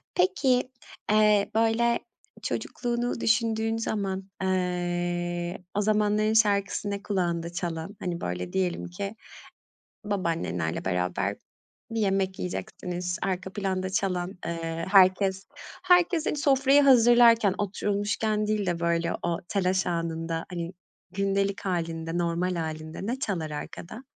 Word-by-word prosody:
Peki, 250 +8 +2 0.4
eee, 210 -1 +4
böyle 230 +1 +3 0.4
çocukluğunu 240 -1 -2
düşündüğün 225 -1 +1
zaman, 195 -4 -2
eee, 175 -1 -1
o 205 - +2
zamanların 210 0 +2
şarkısı 205 -2 +2
ne 200 0 -4
kulağında 170 -4 -1
çalan? 175 +3 -4
Hani, 175 -2 -3
böyle, 90 0 -4
diyelim 185 -2 -1
ki 195 +4 -5 0.9
babaannenlerle 165 - -2
beraber 90 -1 -1 0.6
bir 225 - -1
yemek 195 -2 0
yiyeceksiniz. 180 0 -4
Arka 190 0 -2
planda 190 -2 -2
çalan, 185 -1 -1
eee, 165 0 -3
herkes, 190 0 +5 0.4
herkes, 355 -2 +4
hani, - - 0
sofrayı 275 0 +4
hazırlarken, 235 -5 +6
oturulmuşken 205 +1 -1
değil 210 -2 0
de, 175 -2 -1
böyle, 170 0 +1
o 170 -1 0
telaş 190 -1 +1
anında, 165 -1 -2
hani, 170 -1 -4 0.4
gündelik 195 0 0
hâlinde, 165 -2 -2
normal 175 +1 0
hâlinde 155 +3 -5
ne 250 +3 -2
çalar 170 - -2
arkada? 170 - -7
190 Hz, 115 wpm, -27 LUFS, 175-215 Hz, 0.9 s, hazırlarken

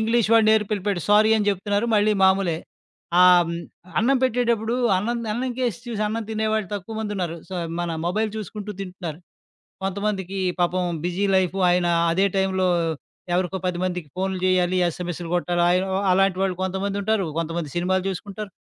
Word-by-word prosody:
English 225 0 +2
వాడు 225 -1 +6
నేర్పి 215 -1 +3
ఎళ్లిపోయాడు 195 -3 -2
sorry 215 +1 +6
అని 210 -1 0
జెప్తున్నారు, 205 +3 0
మళ్ళీ 210 0 +3
మామూలే. 190 -4 +3 0.6
ఆహ్, 180 -1 +7
హ్మ్. 170 0 -3 0.4
అన్నం 270 +4 +3
పెట్టేటప్పుడు 235 -2 +1 0.2
అన్నం‌ది 235 +3 -2
అన్నంకేసి 245 -1 -2
చూసి 220 -3 -3
అన్నం 225 +1 -3
తినేవాళ్ళు 220 -2 -1
తక్కువ 205 +3 -6
మందుంన్నారు. 190 -6 -3
సో, 190 - -6 0.3
మన 175 -1 -2 0.2
మొబైల్ 215 +5 0
చూసుకుంటూ 210 0 -6
తింటున్నారు. 180 -5 -6 0.6
కొంతమందికి 195 -1 -2 0.2
పాపం 180 +1 +1 0.2
బిజీ 180 +3 -1
లైఫు 185 +1 +1
ఆయన 175 0 +2 0.3
అదే 190 +3 +2
టైంలో 190 -1 +1 0.7
ఎవరికో 185 +1 0
10 180 -1 -1
మందికి 180 -4 -3
ఫోనులు 190 0 -1
జేయాలి, 185 -1 +2
ఎస్ఎంఎస్‌లు 175 0 -4
గొట్టాలి 175 0 +1
అయ్యో! 185 +2 +1 0.2
అలాంటి 195 0 +3
వాళ్ళు 190 -1 +1
కొంతమందుంటారు, 200 +2 -1
కొంతమంది 165 -1 -2
సినిమాలు 185 +2 +1
జూసుకుంటారు, 200 +2 -6
195 Hz, 150 wpm, -23 LUFS, 180-215 Hz, 0.7 s, ఆహ్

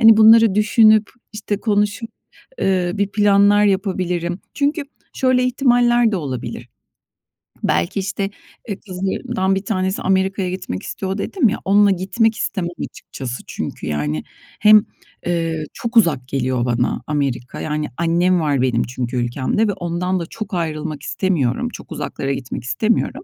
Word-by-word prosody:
hani, 225 -1 +8
bunları 220 -1 +7
düşünüp, 215 0 +4 0.2
işte, 210 -1 -3
konuşup, 210 +1 0 0.5
eee, 185 -2 +1
bir 200 -1 0
planlar 205 0 +4
yapabilirim. 185 -3 -1
Çünkü 290 +2 0 0.3
şöyle 255 -1 +2
ihtimaller 240 -2 +3
de - - +1
olabilir, 135 -8 -5 1.0
belki, 85 - 0
işte, 195 0 -2 0.4
eee, 200 - -4
kızlarımdan 190 +2 -1
bir 195 +1 -3
tanesi 190 -2 -1
Amerika'ya 190 0 +1
gitmek 180 - -5
istiyor, 190 0 -4
dedim 245 - +1
ya, 215 - -2
onunla 200 +1 +5
gitmek 215 +5 +1
istemem 180 -4 -2 0.2
açıkçası. 125 -2 -7
Çünkü, - - -5
yani, 75 0 -2 0.4
hem, 215 0 +7 0.4
eee, 165 -2 -1
çok 235 0 -3
uzak 150 - +3
geliyor 130 -2 -1
bana 120 0 0
Amerika. 140 -5 -2
Yani, 150 0 -2
annem 175 +2 +2
var 145 -5 +1
benim 125 -2 +1
çünkü 125 0 -4
ülkemde 130 - 0
ve 205 - 0
ondan 180 +1 -2
da 170 - -4
çok 215 +3 -7
ayrılmak 155 -4 -3
istemiyorum. 140 -9 0
Çok - - -11
uzaklara 135 0 -3
gitmek 125 -2 -5
istemiyorum. 215 - 0
190 Hz, 140 wpm, -20 LUFS, 150-210 Hz, 1.0 s, hani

